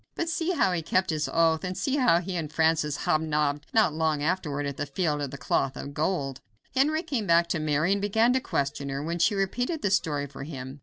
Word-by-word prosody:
But 335 - -2
see 330 +2 0
how 280 - +2
he 175 -2 -1
kept 185 +3 +1
his 155 -1 -1
oath, 165 -1 +2
and 180 0 -4
see 270 +8 0
how 230 -11 +4
he 180 +1 -5
and 160 -3 -3
Francis 160 -2 +1
hobnobbed 150 -2 0
not 215 -8 +3
long 155 -2 0
afterward 150 -4 -1
at 140 -1 -4
the - - -3
Field 150 0 -1
of 140 - -2
the 140 - -8
Cloth 130 +1 0
of 140 - -7
Gold. 145 -4 -2 0.3
Henry 305 +5 +2
came 260 - -2
back 170 0 +5
to 170 - 0
Mary 155 +3 +1
and 200 0 +1
began 220 +4 +3
to 260 - +2
question 140 - -2
her, 135 +1 -3
when 170 +2 -3
she 205 +5 +3
repeated 245 - -1
the 200 - +1
story 150 -7 +1
for 140 -1 -9
him. 135 -2 -7
165 Hz, 235 wpm, -27 LUFS, 145-195 Hz, 0.3 s, back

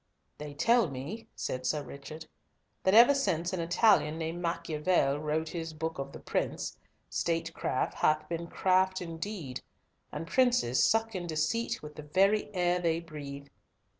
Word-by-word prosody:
"They 150 -1 -7
tell 230 +3 +3
me," 150 - -6
said 130 0 -3
Sir 150 -2 0
Richard, 140 +4 -9 0.6
"that 190 +2 +3
ever 240 +5 +9
since 175 - 0
an 185 - -1
Italian 170 -2 +3
named 165 +2 -4
Machiavel 155 -3 +1
wrote 155 +1 -1
his 165 -2 -5
Book 160 -1 -4
of 135 0 -4
the - - -9
Prince, - - -2 0.3
statecraft 165 -5 -1
hath 155 0 +1
been 170 +1 -4
craft 185 +1 +2
indeed, 165 -4 -5 0.5
and 155 +2 -5
princes 185 - +3
suck 225 0 +2
in 180 -2 -4
deceit 160 +9 -1
with 150 0 -8
the - - -5
very 195 +9 +2
air 180 0 +2
they 165 -2 +1
breathe. 140 -4 -8
165 Hz, 150 wpm, -30 LUFS, 150-185 Hz, 0.6 s, ever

